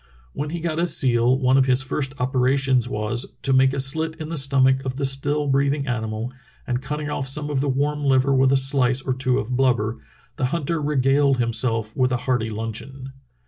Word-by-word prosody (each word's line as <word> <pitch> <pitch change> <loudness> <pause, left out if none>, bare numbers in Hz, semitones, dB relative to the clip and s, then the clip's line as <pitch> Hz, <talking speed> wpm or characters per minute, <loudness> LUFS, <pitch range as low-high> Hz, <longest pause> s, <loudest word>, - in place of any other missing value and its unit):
When 145 +1 -4
he 170 +1 -5
got 165 -1 -2
a 175 - +1
seal 125 -4 +2
one 130 0 +3
of 135 - +2
his 130 +1 +3
first 135 +1 -3
operations 130 -1 +1
was 110 +1 -3
"to 135 - +2
make 130 0 +4
a 140 - -3
slit 160 +4 0
in 155 0 -6
the 165 - -4
stomach 135 -2 +2
of 130 -1 -4
the 140 0 -2
still 145 +2 0
breathing 140 +1 +1
animal, 110 -1 -3 0.3
and 125 0 -2
cutting 150 +2 -4
off 135 -2 -3
some 150 +2 -2
of 135 -2 0
the 140 - -1
warm 145 +2 -1
liver 135 0 +3
with 135 0 +3
a 135 - +4
slice 135 -1 +1
or 130 - -1
two 130 -1 0
of 125 +4 -2
blubber, 120 -4 +1 0.4
the 130 - 0
hunter 160 +3 -2
regaled 140 -1 +2
himself 115 -2 -1
with 130 -1 +1
a 125 - +1
hearty 120 -3 -1
luncheon.' 115 +5 -6
135 Hz, 205 wpm, -22 LUFS, 125-140 Hz, 0.4 s, make